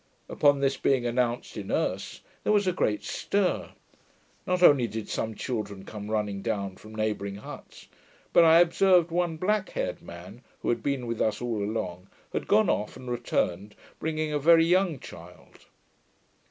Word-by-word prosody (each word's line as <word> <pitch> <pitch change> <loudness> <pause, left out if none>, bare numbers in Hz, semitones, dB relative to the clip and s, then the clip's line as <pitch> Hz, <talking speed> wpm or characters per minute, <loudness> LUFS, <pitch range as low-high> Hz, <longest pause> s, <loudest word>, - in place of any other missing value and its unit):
Upon 145 -1 +3
this 135 0 +1
being 130 -3 +1
announced 120 0 -1
in 100 -2 -6
Erse, - - -2 0.2
there - - +1
was 205 -1 +3
a 185 - +2
great 105 - 0
stir; 200 -2 -1 0.8
not 180 -1 +1
only 135 -7 +6
did 110 -1 -6
some 110 -1 -3
children 105 -6 -4
come 105 -1 -8
running 105 -2 -1
down 100 -3 -3
from 110 0 -13
neighbouring 105 -2 -2
huts, 100 - -11 0.5
but 170 - +7
I 165 +1 +7
observed 175 0 +4
one 170 -1 0
black 210 +4 0
haired - - -3
man, - - -11 0.2
who - - -1
had 120 -1 0
been 135 0 -2
with 115 -1 -3
us 110 - +1
all 120 -3 -2
along, 95 -4 -4 0.3
had - - -3
gone 110 - +4
off, 105 - -1
and 125 -1 -7
returned, 105 -4 -2 0.2
bringing 155 -1 -2
a 150 - +1
very 165 +2 +6
young 180 -2 +2
child. - - -14
120 Hz, 165 wpm, -27 LUFS, 105-165 Hz, 0.8 s, but